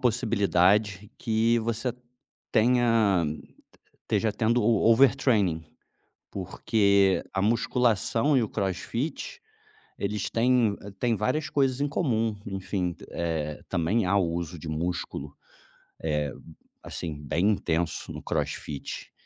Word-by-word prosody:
possibilidade, 105 -4 +2
que 115 +1 +2
você 115 +2 -2 0.6
tenha 115 -6 +3 0.8
esteja 110 -2 0
tendo 115 +2 +1
o 110 0 +4
overtraining, 115 - +3 0.7
porque 100 0 +2
a 95 - 0
musculação 120 +4 +2
e - - +4
o 110 - -3
CrossFit 125 - -3 0.6
eles 100 0 -2
têm 115 -3 +2 0.2
têm 120 -2 +1
várias 125 +9 -1
coisas 135 -2 +1
em 145 - +1
comum. 115 - 0
Enfim, 95 -2 -2 0.2
eh, 80 -3 -3
também, 95 +4 +1
há 95 +2 +2
o 85 -4 +1
uso 85 0 -4
de 80 - -8
músculo 80 -3 -3 0.7
é, 75 -3 -1 0.5
assim, 80 -3 -5
bem 85 +8 +1
intenso 85 -4 -1
no - - -7
CrossFit. 70 -2 -4
105 Hz, 110 wpm, -27 LUFS, 90-115 Hz, 0.8 s, o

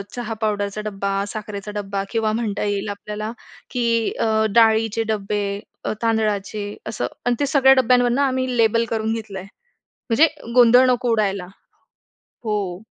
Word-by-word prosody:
चहा 235 -2 -4
पावडरचा 205 -1 -1
डब्बा, 200 -1 -2
साखरेचा 210 -1 -6
डब्बा 200 -1 -3
किंवा 225 -2 0
म्हणता 220 -3 -2
येईल 205 0 -1
आपल्याला 210 +1 -5 0.4
की 230 -2 +1
अ, 220 -1 +2
डाळीचे 225 -1 +4
डब्बे 205 0 -2 0.4
अ, - - 0
तांदळाचे 215 -2 0 0.2
असं 120 - -2 0.2
आणि 245 0 +2
ते - - +3
सगळ्या 270 -2 +6
डब्यांवरुन 245 +1 +3
आम्ही 260 -2 0
लेबल 230 0 +3
करून 220 0 -1
घेतलं 215 -4 -5
आहे. 190 - -10 0.6
म्हणजे 270 +8 +6 0.3
गोंधळ 245 +1 +7
नको 245 -1 +1
उडायला. 200 -4 0 1.0
हो. 200 -4 -2
220 Hz, 140 wpm, -21 LUFS, 205-235 Hz, 1.0 s, गोंधळ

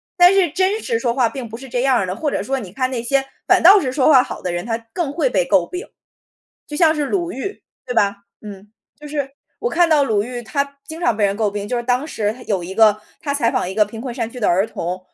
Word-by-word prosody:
但 355 0 +7
是 390 -2 +4
真 380 +5 +1
实 460 0 -1
说 240 - 0
话 255 -3 +3
并 245 -1 -6
不 225 - -7
是 265 +2 -10
这 245 - -1
样 265 -1 +3
儿 195 - 0
的， 185 0 -4
或 295 +7 -1
者 - - -2
说 270 0 -2
你 195 -7 -9
看 255 +5 -1
那 245 -3 -2
些 270 +3 0 0.2
反 - - +4
倒 390 +4 +9
是 260 - -2
说 260 0 +2
话 270 -4 +7
好 - - -7
的 180 - -2
人， 175 0 -3
他 225 0 -2 0.2
更 335 -6 -2
会 345 - +1
被 - - +2
诟 - - +3
病。 360 +1 -6 0.8
就 295 - -8
像 320 -1 +4
是 300 -2 -1
鲁 345 +3 -1
豫， 390 +11 -6 0.2
对 250 - -4
吧？ 200 -3 +2 0.3
嗯， 205 -1 -10 0.3
就 300 - -11
是 285 -2 -3 0.3
我 475 - -2
看 345 0 +3
到 300 -3 +4
鲁 215 -6 +1
豫 240 +2 -6
她 280 +6 -3
经 320 +1 -8
常 240 -10 +1
被 210 - +1
人 200 0 +1
诟 215 -1 0
病， 205 0 -5
就 245 - -1
是 - - -3
当 250 +4 0
时 215 -8 -2
有 195 -4 -1
一 185 +2 -7
个 215 -1 +5 0.2
她 285 - -2
采 235 -5 +2
访 - - -1
一 - - -6
个 210 0 +4
贫 220 +2 -9
困 250 -2 -5
山 230 -3 -3
区 250 - -9
的 220 - +1
儿 190 +4 +2
童， 180 -2 -4
250 Hz, 295 characters per minute, -20 LUFS, 215-300 Hz, 0.8 s, 倒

